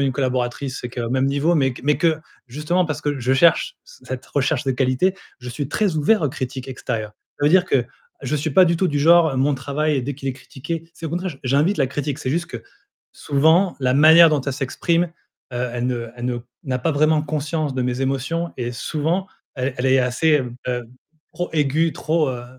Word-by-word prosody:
une 135 -1 +1
collaboratrice, 130 0 -2
c'est 125 - -5
que 125 0 -6
même 130 +2 +1
niveau, 145 +5 +1
mais 135 -3 +2
q - - -12
mais 150 0 +2
que, 160 -3 +2 0.3
justement, 150 +8 0
parce 155 -3 -4
que 145 -1 -2
je 130 +1 0
cherche 170 - +3
c - - -18
cette 130 -1 -5
recherche 140 -1 0
de 135 - 0
qualité, 130 +8 +1 0.3
je 125 - -8
suis 135 +4 -4
très 190 +1 0
ouvert 180 +8 +3
aux 150 - +2
critiques 130 -1 -5
extérieures. 115 -4 -4 0.3
Ça - - +1
veut - - +6
dire 180 +3 +5
que 130 -8 +1 0.4
je 135 +3 -1
suis 155 +2 -2
pas 185 +6 +6
du 170 -1 +1
tout 185 - +1
du 145 -4 -1
genre, 165 -2 +5
mon 140 +2 +2
travail 145 +2 -1
dès 140 +3 -4
qu'il 135 0 -5
est - - -1
critiqué 155 +5 -7
c'est 165 - -7
au - - -5
contraire, 180 +3 -2
j 140 - -12
j'invite 145 +10 +2
la 135 - +2
critique. 145 0 -3
C'est 130 - -3
juste 170 +4 -1
que, 120 -2 -8 0.5
souvent, 160 +6 +2
la 130 -1 +2
manière 160 +4 +8
dont 150 -2 +1
elle 140 +1 -3
s'exprime, 165 +5 0 0.5
heu, 125 0 -2
elle 120 0 -2
ne 120 -2 -2
elle 120 0 -7
ne 125 -1 -1 0.2
n'a 130 -2 -2
pas 160 +5 0
vraiment 155 +1 +3
conscience 150 -1 -2
de 130 - -1
mes 125 +1 -2
émotions 135 +6 -2
et 120 -1 -3
souvent 155 +9 -2 0.3
elle 130 0 -2
elle 125 - -1
est 130 0 +4
assez, 135 +5 +2 0.3
heu, 125 -1 -2 0.5
trop 175 - -4
aiguë, 155 +1 +1
trop, 155 -2 0
heu, 120 -1 -6
140 Hz, 220 wpm, -21 LUFS, 130-160 Hz, 0.5 s, manière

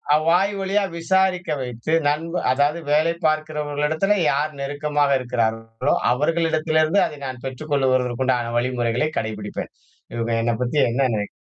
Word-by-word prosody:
அ - - +5
வாய் 185 +4 +3
வழியா 195 +2 +1 0.2
விசாரிக்க 185 +1 +1
வைத்து 125 +4 -4
நண்ப 160 +3 -1 0.2
அதாவது 145 +5 +1
வேலை 155 +3 +3
பாக்கிறவர்களிடத்தில, 155 +4 0 0.2
யார் 150 +3 0
நெருக்கமாக 145 +1 0
இருக்கிறார்களோ, 115 0 -1 0.2
அவர்களிடத்திலிருந்து 160 +4 +2
அதை 150 - -6
நான் 130 -2 -6
பெற்றுக்கொள்ளுகிறதற்கு 130 -2 0
உண்டான 120 -2 0
வழிமுறைகளை 125 +2 0
கடைப்பிடிப்பேன். 105 -2 -5 0.4
இவுங்க 115 0 -1
என்னை 120 0 +1
பத்தி 125 +4 -2
என்ன 120 +4 -1
நெனைக் 105 -1 -3
145 Hz, 125 wpm, -22 LUFS, 125-155 Hz, 0.4 s, அ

